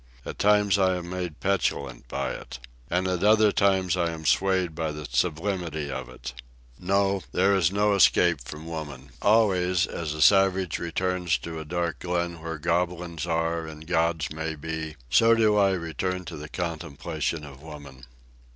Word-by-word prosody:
At - - -7
times 105 -1 +4
I 95 -1 +3
am 90 0 -6
made 90 -4 -4
petulant 70 -10 -1
by - - -2
it. - - -8 0.3
And 90 +2 0
at 90 0 -1
other 105 0 +5
times 95 -3 +2
I 85 -2 +1
am 80 -1 -7
swayed 95 0 +2
by 80 -1 -2
the 75 0 -7
sublimity 80 +1 -1
of 65 -2 -5
it. - - -8 0.5
No; 100 +1 +1
there 100 +2 +3
is 90 -3 +2
no 105 +1 +2
escape 85 -5 +4
from 75 +5 -9
woman. 75 -5 -7
Always, 95 -5 +3
as 80 -3 -4
a 75 - -4
savage 95 -2 +4
returns 90 0 0
to 80 -1 -5
a 80 - -7
dark 85 -1 -2
glen 85 -1 -2
where 80 -1 -5
goblins 85 +1 -1
are 85 0 -1
and 80 0 -10
gods 80 -3 0
may 80 0 -3
be, 80 0 -5 0.2
so 115 +7 +6
do 110 -2 +3
I 100 -1 +4
return 90 +2 -3
to - - -7
the 75 +1 -8
contemplation 80 -2 -3
of 70 -2 -11
woman. 70 -4 -11
85 Hz, 170 wpm, -26 LUFS, 80-95 Hz, 0.5 s, so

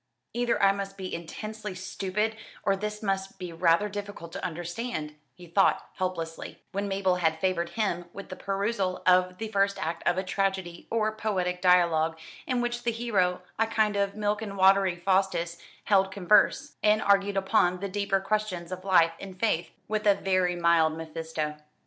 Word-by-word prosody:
"Either 240 0 +1
I 195 - +7
must 195 0 -5
be 190 -1 -5
intensely 210 +4 -6
stupid 195 +3 -2 0.3
or 195 - +2
this 210 +2 -5
must 195 -1 -2
be 180 -2 -6
rather 170 +4 +3
difficult 205 -4 -7
to - - -7
understand," 175 -1 -4 0.2
he 180 - -13
thought 185 +4 +2
helplessly, 170 -3 -4
when 200 +1 -2
Mabel 195 -2 +1
had 160 -2 +1
favoured 175 -1 0
him 175 -5 0
with 200 +1 -9
the 185 - -6
perusal 195 -1 -2
of 180 0 +4
the 220 +1 -4
first 200 -1 +1
act 165 +1 -3
of 175 - +3
a 190 - 0
tragedy 190 -2 -2
or 215 -1 +1
poetic 185 -5 -1
dialogue, 170 -3 +4 0.3
in 250 -2 +1
which 240 0 -2
the 235 - 0
hero, 195 -6 0 0.2
a 225 - +3
kind 220 -2 +1
of 200 0 0
milk 210 0 -1
and 200 -2 -5
watery 190 -1 +5
Faustus, 175 -2 0 0.2
held 195 -2 +3
converse, 200 +2 +3
and 215 0 +3
argued 200 0 +3
upon 190 -2 +2
the 200 - -3
deeper 200 0 0
questions 195 -3 -2
of 185 0 -5
life 180 -4 +5
and 190 -2 -9
faith, 175 -6 +1 0.2
with 215 0 -1
a 200 - +6
very 185 -2 +1
mild 170 -2 +3
Mephisto. 160 -1 -4
190 Hz, 175 wpm, -28 LUFS, 175-205 Hz, 0.3 s, I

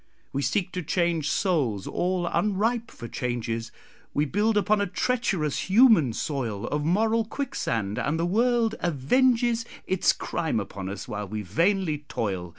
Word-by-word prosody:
We 140 - 0
seek 185 +5 0
to 180 - -3
change 165 -1 0
souls 135 - 0
all 180 0 -1
unripe 220 +6 0
for 120 - -9
changes; 115 -1 -3 0.4
We 145 - +2
build 210 +8 +1
upon 205 0 +2
a 200 - 0
treacherous 190 - -1
human 200 - +6
soil 115 -7 -3
Of 150 0 -2
moral 220 +7 +2
quicksand, 115 - -2
and 160 +2 -1
the 170 - +1
world 230 +4 +2
avenges 230 - +2 0.2
Its 190 -1 +3
crime 160 -9 -2
upon 100 -1 -5
us, 100 0 -6
while 105 -1 -4
we 105 +1 -4
vainly 165 - +1
toil. 95 -5 -2
170 Hz, 150 wpm, -26 LUFS, -, 0.4 s, human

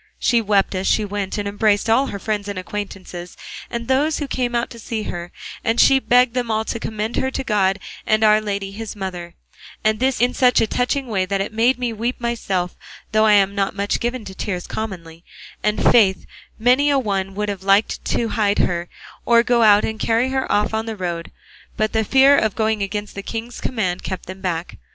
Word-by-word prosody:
She 235 -2 +2
wept 205 -2 +2
as 185 0 -2
she 215 - +2
went, 200 -1 -3
and 205 -1 -2
embraced 205 +1 +1
all 255 +5 +3
her 200 - -5
friends 205 0 -3
and 200 -2 -5
acquaintances 185 -2 -7 0.3
and 235 -1 -5
those 285 +4 +2
who 290 - -3
came 245 -2 -2
out 235 +1 -1
to 235 - -10
see 220 0 -4
her, 175 -2 -6 0.3
and 225 +1 +1
she 270 - +6
begged 250 -1 +3
them 245 -2 -2
all 220 0 0
to 230 - -3
commend 220 +1 -3
her 265 - +1
to 265 - -4
God 200 -5 +1 0.3
and 215 0 +2
Our 215 0 +5
Lady 200 -2 -3
his 220 +2 -7
mother, 180 -3 -6 0.5
and 215 0 +2
this 260 +1 +1
in 245 +2 +2
such 250 -2 +4
a - - +3
touching 250 +5 -1
way 195 -6 -1
that 195 +1 -1
it 195 +3 -3
made 235 +4 +3
me 245 -2 -2
weep 235 +3 -3
myself, 195 -7 -2 0.4
though 215 0 +4
I'm 200 -2 +4
not 195 -1 -1
much 200 0 -1
given 240 -1 -3
to 190 - -8
tears 185 -2 -4
commonly; 170 -6 -6 0.4
and, 210 0 0
faith, 200 -5 +4 0.3
many 255 +6 +3
a 285 - +3
one 195 -6 -2
would 210 +1 -2
have 200 -2 -4
liked 195 +2 +2
to 230 - 0
hide 205 -3 +1
her, 175 -1 0 0.3
or 235 -1 +4
go 240 -1 +2
out 210 -2 +6
and 220 0 -4
carry 230 +3 +1
her 265 0 -1
off 210 +1 +1
on 220 +1 -2
the 225 - -3
road; 175 -3 -4 0.5
but 215 0 0
the 220 0 +2
fear 270 +4 +5
of 220 -7 +1
going 220 -1 0
against 205 +1 -3
the 200 - -6
king's 230 +3 -6
command 185 -7 -2
kept 190 -2 -5
them 190 +1 -9
back. 175 -2 -3
215 Hz, 215 wpm, -21 LUFS, 195-235 Hz, 0.5 s, she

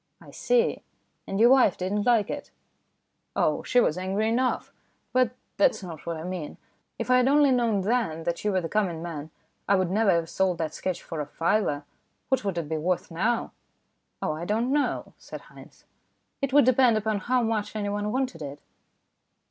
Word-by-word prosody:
" - - -50
I - - -14
see. 485 -1 +1 0.5
And 195 - -2
your 235 +3 +7
wife 255 -8 +5
didn't 205 +4 -1
like 230 -4 +3
it? - - -6 0.3
" - - -48
" - - -50
Oh, - - +1
she 250 - +2
was 180 -7 +2
angry 195 +4 -1
enough; 250 +3 0 0.4
but 250 -1 +2 0.2
that's 200 - +3
not 170 -3 -9
what 170 -1 -2
I 160 - -7
mean. 180 -4 -5 0.4
If - - -2
I 255 - +6
had 250 0 +3
only 285 0 +5
known 230 -5 +2
then 195 -7 0
that 170 +1 -3
you 210 - +1
were 185 -1 +1
the 165 - -3
coming 175 -5 -1
man, 160 -3 -6 0.4
I 200 - +6
would 185 -2 +1
never 215 +1 +2
have 170 -2 +2
sold 185 0 0
that 160 -2 -3
sketch 185 -2 -3
for 160 -2 -5
a 145 - -5
fiver. 165 -2 0 0.5
What 265 -3 +1
would 195 -4 -2
it 165 -3 -2
be 160 +1 -2
worth 180 +2 -1
now? 220 +8 0 0.3
" - - -49
"Oh, - - 0
I 155 +2 -5
don't 225 +7 0
know," 290 -1 -1
said - - -9
Haynes; - - -16 0.6
"it 275 -1 -1
would 285 -2 +6
depend 250 -2 +4
upon 215 -1 -1
how 245 +5 +1
much 220 -2 -2
anyone 205 0 -2
wanted 255 -8 -2
it." 145 0 -6
205 Hz, 205 wpm, -26 LUFS, 170-240 Hz, 0.6 s, your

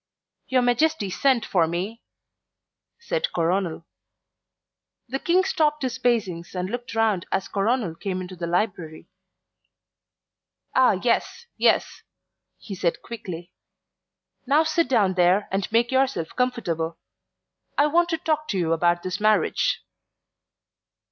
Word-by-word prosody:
"Your 255 -1 +2
Majesty 245 -3 +1
sent 260 +2 +2
for 170 -4 +2
me," 190 +7 -4 1.0
said - - -2
Coronel. 170 -1 -1 1.2
The 270 +3 -3
King 360 +5 +3
stopped 300 -5 +1
his 255 0 -2
pacings 195 -9 -1
and 180 +2 -3
looked 245 -1 -5
round 220 -5 +1
as 190 0 -1
Coronel 210 -2 0
came 185 +2 -4
into 185 0 -7
the 170 -1 -4
library. 175 -3 -2 1.6
"Ah, 260 -4 +5
yes, 355 - 0
yes," - - +2 0.6
he 205 - -9
said 175 -2 -1
quickly. 175 -7 -7 1.0
"Now 295 +4 +4
sit 320 +1 +1
down 210 -7 +3
there 180 +3 +3
and 195 +3 -2
make 235 +2 +2
yourself 260 -11 0
comfortable. 170 -11 -1 0.8
I 290 - +5
want 340 +3 +2
to 325 - 0
talk 310 -1 -1
to 200 - -2
you 165 -2 +1
about 175 +1 +1
this 185 +2 -3
marriage." 215 0 +2
215 Hz, 125 wpm, -24 LUFS, 180-260 Hz, 1.6 s, Ah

